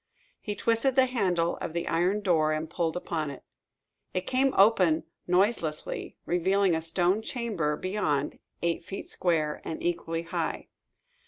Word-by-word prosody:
He 210 - -4
twisted 230 +5 +1
the 260 -1 +6
handle 185 -9 0
of - - -5
the 170 0 -2
iron 180 +5 +1
door 160 -5 +3
and 155 +1 -2
pulled 165 0 -1
upon 160 -4 -2
it. 140 - -9 0.7
It 185 - +2
came 265 +4 +2
open 190 -6 +5 0.2
noiselessly, 180 -4 0
revealing 190 +2 +2
a 160 - 0
stone 175 +5 +1
chamber 215 -11 -1
beyond, 170 -7 -1 0.2
eight 170 -1 0
feet 190 +3 -6
square, 155 -4 0
and 160 - -5
equally 165 -1 -1
high. 170 - -3
175 Hz, 145 wpm, -28 LUFS, 165-200 Hz, 0.7 s, the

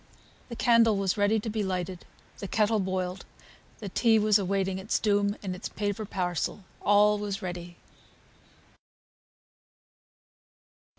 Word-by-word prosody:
The 235 - -6
candle 230 -3 +4
was 195 -2 0
ready 205 +2 +2
to 215 - -7
be 220 0 -2
lighted, 185 -1 -4 0.3
the 200 - -5
kettle 215 +2 +1
boiled, 185 -1 -2 0.5
the 205 - -7
tea 225 +3 +3
was 210 -1 +4
awaiting 195 -1 -1
its 195 +3 -1
doom 205 -1 +1
in 190 -2 -3
its 180 - -6
paper 205 +1 -3
parcel; 180 0 -3 0.2
all 205 +1 +4
was 205 -2 -4
ready. 175 -1 -6
200 Hz, 125 wpm, -28 LUFS, 185-210 Hz, 0.5 s, candle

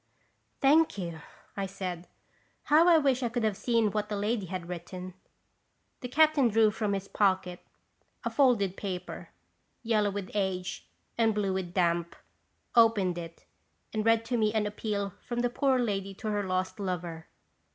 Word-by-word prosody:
"Thank 300 -1 +4
you," 170 -4 -5 0.4
I 195 -1 -2
said. 185 -3 -6 0.6
"How 310 +3 +5
I 340 -2 +7
wish 270 -4 +2
I 240 - 0
could 240 0 -2
have 215 -2 +1
seen 230 -1 +1
what 210 0 -2
the 210 - -2
lady 205 0 -1
had 180 -1 -5
written! 180 +1 -7 0.4
" - - -46
The 250 - -4
captain 300 0 +4
drew 220 -1 +4
from 210 -1 -1
his 195 0 -3
pocket 185 -3 +1 0.7
a - - -1
folded 230 -9 +3
paper, 185 -3 -6 0.5
yellow 215 -3 +2
with 200 -1 -5
age 190 -3 -2 0.3
and 225 -2 +3
blue 200 -2 0
with 185 -2 -4
damp, 170 -2 +1 0.6
opened 210 -7 +4
it 165 -1 -10 0.5
and 215 -1 0
read 225 0 +3
to 245 +1 -1
me 215 -2 +2
an 215 -1 +2
appeal 205 -2 -3
from 240 0 -2
the 245 0 0
poor 265 0 +2
lady 195 -5 -2
to 215 - -5
her 205 0 0
lost 185 +2 -2
lover. 175 -4 -4
205 Hz, 165 wpm, -29 LUFS, 185-230 Hz, 0.7 s, I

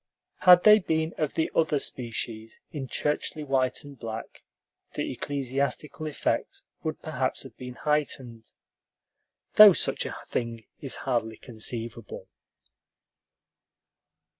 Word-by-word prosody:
Had 180 -1 +8
they 215 0 +8
been 160 -3 -1
of 155 -3 -1
the 160 - 0
other 155 -2 +2
species, 115 -4 -4
in 145 -5 -5
churchly 150 +3 -2
white 130 -2 0
and 145 -2 -12
black, 115 -1 -7 0.5
the - - -2
ecclesiastical 140 +3 -2
effect 150 - -2 0.2
would - - -4
perhaps - - -2
have - - -12
been 125 -1 -8
heightened, 130 -7 -2 1.1
though 210 -2 +11
such - - -1
a - - -6
thing 115 -2 -3
is 135 - -2
hardly 115 -4 -1
conceivable. 115 -1 -5
135 Hz, 115 wpm, -27 LUFS, 115-150 Hz, 1.1 s, though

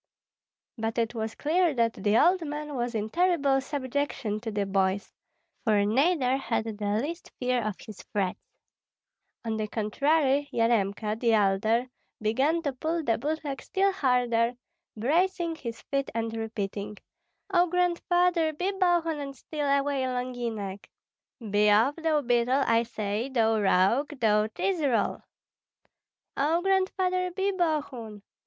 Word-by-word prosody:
But 225 +1 -2
it 230 0 0
was 220 -1 -4
clear 330 0 +1
that 230 -1 +2
the 210 +1 +1
old 360 +6 +4
man 300 -1 -5
was 240 -1 -2
in 215 0 -2
terrible 325 -7 +2
subjection 270 -5 -2
to 225 +1 -5
the 205 -2 -1
boys, 195 +1 0 0.5
for 210 -3 +3
neither 265 - +2
had 230 -4 -1
the 215 -2 -5
least 330 +7 -5
fear 250 -1 0
of 215 -3 -2
his 215 -3 -10
threats; 190 -3 -1 1.0
on 220 -1 -1
the 215 0 -2
contrary, 280 +6 +1
Yaremka, 215 -2 0
the 230 -2 +2
elder, 215 +3 +2 0.3
began 270 +10 +1
to 285 -3 -1
pull 320 +5 -2
the 225 -5 +1
boot 310 +5 -2
leg 275 -2 -4
still 390 +1 +1
harder, 245 -7 +1 0.4
bracing 335 - +1
his 235 -8 -7
feet 275 -1 -2
and 225 0 -2
repeating, 210 -2 -4 0.6
"Oh, 355 0 +4
Grandfather, 355 -1 +1
be 360 +6 -1
Bogun 345 -5 +1
and 275 -1 -6
steal 295 +3 -4
away 280 0 +1
Longinek." 240 -6 -4 0.6
"Be 210 +1 +4
off, 225 +8 +4
thou 320 -2 +1
beetle, 245 +2 +2
I 230 0 +3
say, 220 +1 -3
thou 225 -4 +2
rogue, 225 +10 +2
thou 210 -2 +3
cheese 350 - -2
roll!" 245 -8 +1 1.2
"Oh, 320 +5 +1
Grandfather, 375 -1 +1
be 385 +2 -1
Bogun!" 280 - -2
255 Hz, 140 wpm, -27 LUFS, 220-315 Hz, 1.2 s, old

